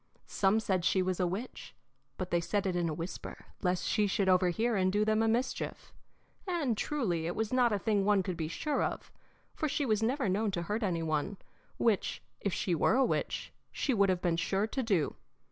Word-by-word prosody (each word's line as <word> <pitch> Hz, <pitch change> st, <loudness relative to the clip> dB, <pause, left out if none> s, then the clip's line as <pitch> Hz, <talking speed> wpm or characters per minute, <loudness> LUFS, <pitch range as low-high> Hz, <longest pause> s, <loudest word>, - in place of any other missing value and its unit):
Some 200 Hz, +2 st, +2 dB
said 190 Hz, -5 st, 0 dB
she 185 Hz, +2 st, +3 dB
was 185 Hz, 0 st, -1 dB
a 180 Hz, -, +2 dB
witch, 200 Hz, +8 st, -6 dB, 0.4 s
but 185 Hz, -1 st, -4 dB
they 175 Hz, -, +2 dB
said 200 Hz, +4 st, -1 dB
it 185 Hz, -2 st, 0 dB
in 175 Hz, -1 st, +1 dB
a -, -, -2 dB
whisper, 165 Hz, +3 st, -7 dB, 0.2 s
lest 180 Hz, 0 st, 0 dB
she 210 Hz, -2 st, +2 dB
should 195 Hz, 0 st, 0 dB
overhear 185 Hz, +6 st, +3 dB
and 185 Hz, -1 st, +2 dB
do 210 Hz, +2 st, +2 dB
them 215 Hz, 0 st, +2 dB
a 225 Hz, -, +2 dB
mischief, 240 Hz, +4 st, -2 dB, 0.5 s
and 320 Hz, -10 st, 0 dB
truly 195 Hz, -, -1 dB
it 175 Hz, -, -3 dB
was 220 Hz, +2 st, -2 dB
not 250 Hz, -2 st, +4 dB
a 205 Hz, -, +2 dB
thing 205 Hz, -1 st, +1 dB
one 200 Hz, -1 st, +3 dB
could 185 Hz, -1 st, -3 dB
be 160 Hz, -2 st, -3 dB
sure 290 Hz, -, -1 dB
of, -, -, -4 dB, 0.4 s
for 310 Hz, -, -2 dB
she 285 Hz, +1 st, 0 dB
was 215 Hz, -3 st, +1 dB
never 255 Hz, +3 st, +1 dB
known 205 Hz, +3 st, +1 dB
to 180 Hz, -3 st, -2 dB
hurt 210 Hz, +6 st, -2 dB
any 175 Hz, -6 st, 0 dB
one, 160 Hz, +5 st, -1 dB, 0.4 s
which, 225 Hz, -5 st, +1 dB, 0.2 s
if 200 Hz, -, -1 dB
she 180 Hz, -, -1 dB
were 165 Hz, +7 st, +3 dB
a 265 Hz, 0 st, +4 dB
witch, -, -, -2 dB, 0.2 s
she 275 Hz, -, 0 dB
would 200 Hz, -3 st, +3 dB
have 180 Hz, -1 st, 0 dB
been 170 Hz, -2 st, +2 dB
sure 195 Hz, +4 st, +1 dB
to 265 Hz, +4 st, -2 dB
do. 195 Hz, -, 0 dB
200 Hz, 215 wpm, -31 LUFS, 180-225 Hz, 0.5 s, not